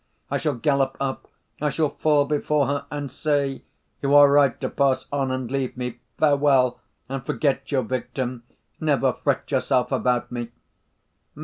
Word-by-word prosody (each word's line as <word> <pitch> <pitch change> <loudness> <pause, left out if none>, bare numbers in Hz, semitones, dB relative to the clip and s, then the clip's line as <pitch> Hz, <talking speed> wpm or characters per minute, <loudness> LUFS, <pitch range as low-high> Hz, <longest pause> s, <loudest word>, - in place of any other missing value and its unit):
I - - +1
shall 150 -4 -1
gallop 135 +2 +1
up, 135 -1 -3 0.3
I 150 - +2
shall 155 0 0
fall 150 -2 +2
before 150 0 +1
her 140 +2 -2
and 145 -2 -5
say, 140 -2 -1 0.4
'You 140 0 +2
are 145 -1 +8
right 140 -3 +4
to - - -2
pass 135 -2 +1
on 140 -2 0
and 130 -2 -3
leave 135 -2 -2
me. 125 -1 -4 0.2
Farewell 140 -4 +3 0.3
and 135 0 -4
forget 140 0 -1
your 135 -3 +1
victim... 125 +1 -3 0.4
never 140 -4 +2
fret - - -2
yourself 125 0 +1
about 125 -2 0
me! 120 -1 -4
135 Hz, 155 wpm, -24 LUFS, 130-145 Hz, 0.4 s, are